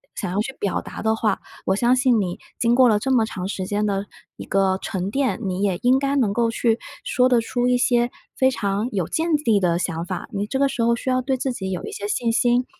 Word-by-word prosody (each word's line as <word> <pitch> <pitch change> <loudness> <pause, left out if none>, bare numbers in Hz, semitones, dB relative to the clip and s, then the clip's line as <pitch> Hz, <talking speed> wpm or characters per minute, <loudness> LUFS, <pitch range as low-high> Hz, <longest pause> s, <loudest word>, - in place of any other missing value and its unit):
想 - - -3
要 190 - -1
去 265 +5 -5
表 200 - -1
达 - - -8
的 220 0 +2
话， 215 -3 0 0.3
我 190 - +3
相 240 +4 +3
信 250 -3 +3
你 180 -3 -3 0.2
经 235 0 +2
过 250 0 +6
了 215 - +4
这 265 +6 -2
么 235 -4 +4
长 185 -4 -5
时 190 -2 -4
间 205 +1 0
的 200 0 -1 0.3
一 - - -7
个 190 -1 +1
沉 190 -1 -3
淀， 270 +1 0
你 190 -1 -2
也 195 -3 +1
应 255 +2 +4
该 275 0 0
能 235 -8 +2
够 235 +1 +1
去 230 0 +1 0.2
说 255 0 +2
得 245 -2 +4
出 245 +2 -1
一 250 0 +3
些 240 -1 +2 0.3
非 260 - +3
常 205 -2 -1
有 185 -6 -1
见 325 0 +1
地 220 -3 +4
的 175 -3 +1
想 170 -2 -2
法。 180 +1 -5
你 205 0 -2
这 265 - -2
个 280 +1 +3
时 250 - -3
候 235 0 +3
需 260 +2 -2
要 255 0 +2
对 260 +1 -1
自 255 0 -2
己 190 -5 -4
有 185 -2 -4
一 - - -6
些 205 - -5
信 230 +2 0
心， 245 +2 +2
225 Hz, 275 characters per minute, -22 LUFS, 195-250 Hz, 0.3 s, 过